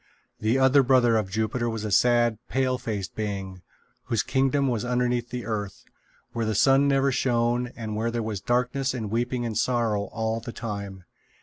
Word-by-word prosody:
The 110 Hz, +4 st, +1 dB
other 135 Hz, +1 st, +5 dB
brother 125 Hz, -3 st, +4 dB
of 105 Hz, -4 st, 0 dB
Jupiter 110 Hz, +4 st, -1 dB
was 110 Hz, -1 st, -4 dB
a 105 Hz, -, -3 dB
sad 120 Hz, +1 st, +3 dB
pale 130 Hz, -1 st, 0 dB
faced 105 Hz, -5 st, -4 dB
being, 95 Hz, -3 st, -4 dB, 0.4 s
whose 115 Hz, -3 st, 0 dB
kingdom 135 Hz, +1 st, +1 dB
was 120 Hz, -4 st, -1 dB
underneath 125 Hz, -1 st, 0 dB
the 125 Hz, -1 st, -5 dB
earth, 105 Hz, -4 st, -4 dB, 0.5 s
where 115 Hz, -, -2 dB
the 110 Hz, -1 st, -1 dB
sun 135 Hz, +5 st, +4 dB
never 135 Hz, 0 st, +2 dB
shone 120 Hz, -1 st, +1 dB
and 110 Hz, -2 st, -5 dB
where 115 Hz, +2 st, -1 dB
there 115 Hz, -1 st, -2 dB
was 105 Hz, -3 st, -4 dB
darkness 125 Hz, +2 st, 0 dB
and 110 Hz, -4 st, -4 dB
weeping 120 Hz, +1 st, -1 dB
and 115 Hz, -2 st, -3 dB
sorrow 115 Hz, -5 st, +1 dB
all 110 Hz, +1 st, -2 dB
the 115 Hz, +1 st, -8 dB
time. 100 Hz, -4 st, -6 dB
120 Hz, 180 wpm, -26 LUFS, 110-125 Hz, 0.5 s, other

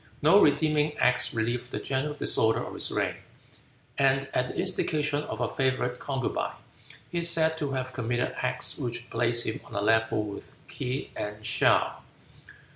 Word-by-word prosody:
No 195 Hz, +7 st, +6 dB
redeeming 150 Hz, 0 st, +2 dB
acts 125 Hz, 0 st, +3 dB
relieve 120 Hz, +2 st, -2 dB
the -, -, -4 dB
general 140 Hz, +2 st, -2 dB
disorder 110 Hz, -5 st, +4 dB
of -, -, -8 dB
his -, -, -1 dB
reign, -, -, -1 dB, 0.8 s
and 135 Hz, 0 st, +2 dB
at 125 Hz, 0 st, +1 dB
the -, -, -8 dB
instigation 150 Hz, -5 st, 0 dB
of 110 Hz, -, -6 dB
a 120 Hz, -, 0 dB
favorite 130 Hz, -1 st, -1 dB
concubine 135 Hz, -3 st, -3 dB, 0.6 s
he 175 Hz, -, -1 dB
is 170 Hz, 0 st, +3 dB
said 160 Hz, -1 st, +3 dB
to 145 Hz, -3 st, -2 dB
have 130 Hz, -1 st, -4 dB
committed 120 Hz, 0 st, -2 dB
acts -, -, -1 dB
which 120 Hz, 0 st, -4 dB
place 120 Hz, 0 st, +1 dB
him 110 Hz, -, -4 dB
on -, -, -13 dB
a -, -, 0 dB
level 110 Hz, 0 st, +2 dB
with 100 Hz, -1 st, -8 dB
Kee 130 Hz, +2 st, -4 dB
and 105 Hz, +1 st, -5 dB
Show. 110 Hz, -, +3 dB
130 Hz, 165 wpm, -27 LUFS, 120-150 Hz, 0.8 s, No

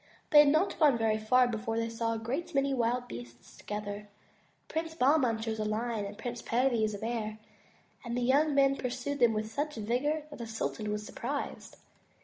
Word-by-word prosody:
They 295 Hz, -, +9 dB
had 295 Hz, -, +8 dB
not 315 Hz, +7 st, +2 dB
gone 290 Hz, -6 st, +5 dB
very 220 Hz, -1 st, +1 dB
far 250 Hz, +3 st, +4 dB
before 225 Hz, -1 st, -2 dB
they 230 Hz, 0 st, 0 dB
saw 230 Hz, 0 st, -1 dB
a -, -, -2 dB
great 265 Hz, +9 st, -4 dB
many 275 Hz, 0 st, +2 dB
wild 245 Hz, 0 st, 0 dB
beasts 120 Hz, 0 st, -10 dB
together. 210 Hz, 0 st, -6 dB, 0.6 s
Prince 320 Hz, 0 st, -3 dB
Bahman 260 Hz, -5 st, +3 dB
chose 220 Hz, -1 st, -3 dB
a -, -, 0 dB
lion 215 Hz, 0 st, -1 dB
and 205 Hz, +1 st, -7 dB
Prince 240 Hz, +1 st, -5 dB
Perviz 230 Hz, -4 st, +1 dB
a -, -, -5 dB
bear 220 Hz, 0 st, -3 dB, 0.7 s
and 235 Hz, -1 st, -3 dB
the -, -, 0 dB
young 285 Hz, +4 st, +3 dB
men 275 Hz, 0 st, +4 dB
pursued 255 Hz, +3 st, -3 dB
them 235 Hz, -2 st, +5 dB
with 215 Hz, 0 st, -3 dB
such 295 Hz, +4 st, -2 dB
vigor 250 Hz, +8 st, 0 dB
that 290 Hz, -, -9 dB
the 235 Hz, -, -5 dB
sultan 220 Hz, -1 st, -3 dB
was 210 Hz, 0 st, -3 dB
surprised. 275 Hz, +6 st, -5 dB
235 Hz, 190 wpm, -31 LUFS, 220-275 Hz, 0.7 s, They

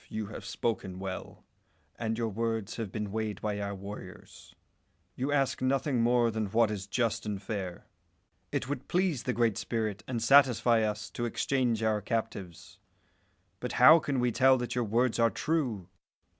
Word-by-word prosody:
you 110 Hz, -1 st, -3 dB
have 105 Hz, -, -8 dB
spoken 95 Hz, -5 st, -3 dB
well, 95 Hz, 0 st, -7 dB, 0.5 s
and 115 Hz, 0 st, -2 dB
your 115 Hz, -1 st, 0 dB
words 110 Hz, 0 st, -2 dB
have 110 Hz, -5 st, -4 dB
been 105 Hz, -1 st, -4 dB
weighed 110 Hz, -1 st, -3 dB
by 105 Hz, -1 st, -2 dB
our 100 Hz, 0 st, -3 dB
warriors. 100 Hz, +2 st, -10 dB, 0.6 s
You 135 Hz, +3 st, -2 dB
ask 140 Hz, -2 st, +1 dB
nothing 130 Hz, -1 st, +1 dB
more 120 Hz, 0 st, +3 dB
than 110 Hz, -1 st, -2 dB
what 110 Hz, +2 st, +2 dB
is 95 Hz, -2 st, -5 dB
just 115 Hz, +1 st, 0 dB
and 105 Hz, -2 st, -3 dB
fair. 95 Hz, -3 st, -5 dB, 0.7 s
It -, -, -2 dB
would 135 Hz, -2 st, -4 dB
please 180 Hz, -8 st, +1 dB
the 125 Hz, -, -1 dB
Great 115 Hz, -3 st, +1 dB
Spirit 110 Hz, -3 st, -2 dB
and 125 Hz, -2 st, -2 dB
satisfy 125 Hz, -3 st, +5 dB
us 105 Hz, 0 st, -2 dB
to 120 Hz, -, -3 dB
exchange 120 Hz, -1 st, 0 dB
our 110 Hz, -1 st, +1 dB
captives; 100 Hz, -5 st, -4 dB, 0.8 s
but 125 Hz, -, -4 dB
how 155 Hz, +7 st, +8 dB
can 140 Hz, -4 st, -2 dB
we 125 Hz, 0 st, +2 dB
tell 130 Hz, +3 st, +5 dB
that 120 Hz, -1 st, -3 dB
your 125 Hz, -1 st, 0 dB
words 120 Hz, +3 st, +1 dB
are 115 Hz, 0 st, +5 dB
true? 120 Hz, -, -1 dB
115 Hz, 170 wpm, -30 LUFS, 105-125 Hz, 0.8 s, how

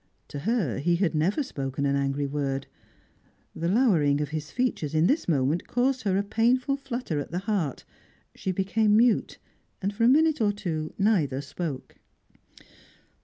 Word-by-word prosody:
To 145 Hz, -, -6 dB
her 205 Hz, -, 0 dB
he 170 Hz, +5 st, +2 dB
had 175 Hz, -1 st, 0 dB
never 175 Hz, -, +1 dB
spoken 135 Hz, -, -4 dB
an 140 Hz, 0 st, +1 dB
angry 140 Hz, +1 st, 0 dB
word. 140 Hz, -1 st, -2 dB, 0.9 s
The 165 Hz, -, -2 dB
lowering 175 Hz, -, +3 dB
of 150 Hz, -2 st, -2 dB
his 155 Hz, 0 st, -5 dB
features 240 Hz, -, -2 dB
in 155 Hz, +1 st, +4 dB
this 285 Hz, -, +1 dB
moment 150 Hz, +1 st, +1 dB
caused 255 Hz, +1 st, +1 dB
her 190 Hz, -1 st, +2 dB
a 200 Hz, -, +1 dB
painful 245 Hz, +6 st, +1 dB
flutter 250 Hz, -, -4 dB
at 145 Hz, -, -5 dB
the 170 Hz, -, -3 dB
heart; 185 Hz, -, -2 dB, 0.5 s
she 190 Hz, -, -3 dB
became 205 Hz, +3 st, +2 dB
mute, 235 Hz, 0 st, +2 dB, 0.4 s
and 200 Hz, +1 st, -2 dB
for 225 Hz, +3 st, -1 dB
a -, -, +6 dB
minute 310 Hz, 0 st, +4 dB
or 210 Hz, -2 st, +3 dB
two 165 Hz, -7 st, -4 dB
neither 180 Hz, -11 st, +2 dB
spoke. 140 Hz, -1 st, -6 dB
180 Hz, 165 wpm, -26 LUFS, 145-225 Hz, 0.9 s, a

